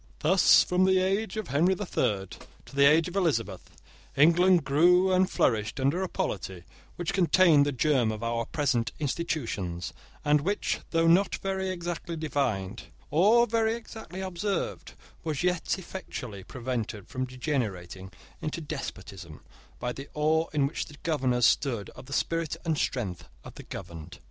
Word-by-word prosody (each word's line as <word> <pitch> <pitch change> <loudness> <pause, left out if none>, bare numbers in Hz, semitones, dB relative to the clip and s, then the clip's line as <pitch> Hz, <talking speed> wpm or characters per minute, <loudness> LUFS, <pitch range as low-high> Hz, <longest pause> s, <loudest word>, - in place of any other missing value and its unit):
Thus, 180 +4 +6
from 180 +1 +2
the 190 0 +4
age 195 +4 0
of 215 - -4
Henry 175 +7 +3
the 205 - -4
Third 100 - -1 0.3
to - - -14
the 140 0 +5
age 160 +2 +4
of 180 - -8
Elizabeth, 115 - -1 0.5
England 170 +4 +5
grew 180 +6 +4
and 185 0 +3
flourished 105 0 0
under 140 +7 +1
a 190 - -2
polity 95 -3 -4 0.3
which 175 -2 -3
contained 170 -5 +5
the - - +1
germ 130 -3 +2
of 110 +1 -6
our 115 0 -1
present 125 -7 0
institutions, 120 - -3 0.3
and 150 0 +4
which, 200 +7 -1
though 165 0 +2
not 180 +4 +4
very 190 -1 -2
exactly 175 -1 -4
defined, 125 -10 -2 0.3
or 215 +9 +5
very 225 0 +1
exactly 220 -5 -9
observed, 190 +2 -3 0.3
was 155 -1 -2
yet 180 0 0
effectually 125 - -7
prevented 115 -3 -4
from 130 0 -3
degenerating 110 - -4 0.3
into 155 +2 -3
despotism, 95 - -7 0.4
by 125 - -3
the 135 +2 -9
awe 160 +2 +2
in 145 -3 +2
which 140 - -3
the 150 - -13
governors 130 -7 +1
stood 120 -8 +1
of 130 - -13
the 140 - -7
spirit 165 0 -1
and 160 -3 0
strength 100 -9 -3
of - - -10
the - - -10
governed. 80 -2 -9
150 Hz, 155 wpm, -28 LUFS, 120-180 Hz, 0.5 s, Thus